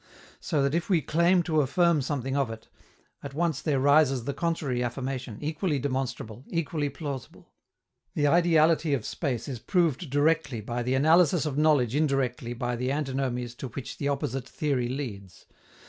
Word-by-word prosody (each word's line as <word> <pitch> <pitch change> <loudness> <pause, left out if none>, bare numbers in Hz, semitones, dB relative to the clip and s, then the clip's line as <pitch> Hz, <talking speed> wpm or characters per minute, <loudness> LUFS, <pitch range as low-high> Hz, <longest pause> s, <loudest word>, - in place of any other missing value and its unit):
So 150 -5 0
that 140 +1 +1
if 170 +3 -1
we 170 -6 +3
claim 170 +5 +3
to 155 -3 +2
affirm 165 +3 +2
something 135 -1 -2
of 140 -4 +1
it, 115 0 -9 0.5
at 140 -1 -8
once 165 -3 0
there 145 -4 +1
rises 140 -2 +4
the 140 +3 -3
contrary 150 -7 -1
affirmation, 125 -2 -4
equally 155 +1 -1
demonstrable, 130 -4 -3
equally 155 -3 -1
plausible. 140 -3 -7 0.6
The 145 - +1
ideality 165 -2 +4
of 125 - -5
space 130 -8 -3
is 130 -4 -5
proved 165 - 0
directly 145 -3 +1
by 120 +3 -3
the 125 +2 0
analysis 160 +3 +4
of 150 -3 -2
knowledge 145 -6 +3
indirectly 135 -5 0
by 120 0 -2
the 125 +2 -1
antinomies 130 -4 -2
to 135 - -5
which 125 +2 -7
the 140 - -1
opposite 135 -2 -2
theory 135 -5 -1
leads. 105 - -6
140 Hz, 160 wpm, -27 LUFS, 125-155 Hz, 0.6 s, rises